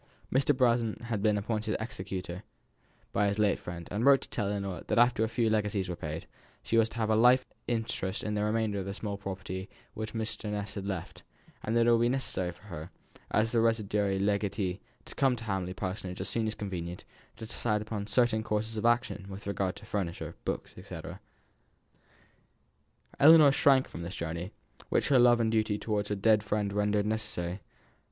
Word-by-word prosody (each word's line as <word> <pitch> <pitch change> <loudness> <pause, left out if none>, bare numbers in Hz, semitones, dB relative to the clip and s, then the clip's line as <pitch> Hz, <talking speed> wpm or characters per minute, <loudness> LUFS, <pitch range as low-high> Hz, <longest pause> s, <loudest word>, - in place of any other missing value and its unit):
Mr. 135 +1 +3
Brown 120 -3 +2
had 115 -3 -2
been 105 -1 +3
appointed 110 +1 -1
executer 95 -4 -5 0.7
by 105 0 +2
his 100 +1 0
late 105 -2 +2
friend, 85 -1 -7
and 105 +4 -1
wrote 140 0 +7
to - - -8
tell 105 - -1
Ellinor 100 -4 -3
that - - 0
after 120 -1 +4
a 110 - 0
few 120 -1 +1
legacies 105 -3 0
were 90 - -2
paid, 80 0 -5 0.4
she - - -1
was 115 -1 +4
to - - -10
have 110 -1 +1
a - - +4
life 125 +3 +5 0.2
interest 110 -5 -2
in 105 - -2
the 105 0 0
remainder 105 -1 0
of 95 - -4
the 100 - -4
small 105 -2 -4
property 95 -1 -5 0.2
which 110 +1 -5
Mr. 110 -1 -3
Ness 105 -1 -3
had 100 -1 -5
left, 95 -4 -5 0.4
and 110 +2 0
that 115 - +4
it 120 - +5
would 115 0 +4
be 120 - +3
necessary 120 -9 -1
for 85 - -19
her, 85 -5 -7 0.4
as 110 +1 +2
the 115 - +3
residuary 105 -3 +1
legatee, 100 -1 0 0.3
to - - -9
come 135 -2 +2
to 115 - -8
Hamley 95 -4 -2
Parsonage 95 -2 -4
as 95 - -3
soon 110 +2 0
as 110 - -2
convenient, 90 -3 -5 0.3
to 110 - -7
decide 105 -1 -1
upon 105 -2 -4
certain 115 0 +2
courses 110 +1 -2
of 105 - -2
action 120 -4 +1
with 100 +1 -8
regard 100 -2 -1
to 105 - -12
furniture, 85 -5 -3
books, - - -3
&c. - - -7 2.2
Ellinor 155 -1 +9
shrank 135 -1 +4
from 85 - -8
this 85 +3 -5
journey, 85 +3 -4 0.4
which - - +1
her 135 -3 +6
love 120 -1 +6
and 110 -1 +2
duty 110 -2 +1
towards 105 -1 -2
her 105 - 0
dead 105 +1 +4
friend 105 -1 -1
rendered 105 0 +1
necessary. 105 -4 -3
105 Hz, 195 wpm, -30 LUFS, 95-115 Hz, 2.2 s, Ellinor